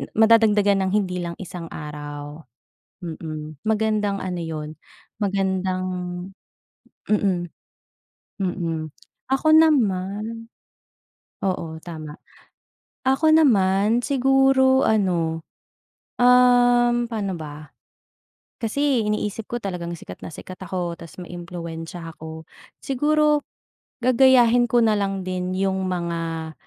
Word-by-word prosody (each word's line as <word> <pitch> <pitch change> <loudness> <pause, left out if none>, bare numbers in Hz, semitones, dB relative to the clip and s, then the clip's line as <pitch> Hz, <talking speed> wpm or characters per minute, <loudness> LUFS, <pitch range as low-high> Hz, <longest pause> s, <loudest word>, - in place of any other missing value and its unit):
madadagdagan 215 -3 +5
ng - - -1
hindi 185 -3 0
lang 170 - -4
isang 175 -2 -7
araw, 145 0 -8 0.6
mm. 155 -3 -7
Magandang 215 -2 0
ano 180 -2 -3
yun 155 -2 -5 0.5
magandang 190 -2 -1 1.2
mm. 190 -5 +1 0.9
Mm, 170 -5 -3 0.4
ako 270 +3 +1
naman, 225 -7 +2 1.0
oo 165 -4 -2
tama. 155 -3 -8 0.9
Ako 305 +4 +4
naman 220 -5 +4
siguro 270 -1 +4
ano, 175 -6 +1 0.8
um, 245 -1 +5
paano 200 -6 -3
ba? 150 -1 -9 0.9
Kasi 255 0 0
iniisip 210 0 -2
ko 240 - -2
talagang 180 -4 -4
sikat 90 - -9
na 165 - -7
sikat 185 +3 -9
ako 175 -2 -3
tas 170 +1 -12
maimpluwensya 170 -1 -7
ako. 160 -1 -10 0.3
Siguro 300 +2 +2 0.6
gagayahin 245 -1 +5
ko 240 0 +3
nalang 200 -3 +1
din 185 0 -3
yung 190 0 0
mga 165 -2 -3
190 Hz, 95 wpm, -23 LUFS, 170-235 Hz, 1.2 s, madadagdagan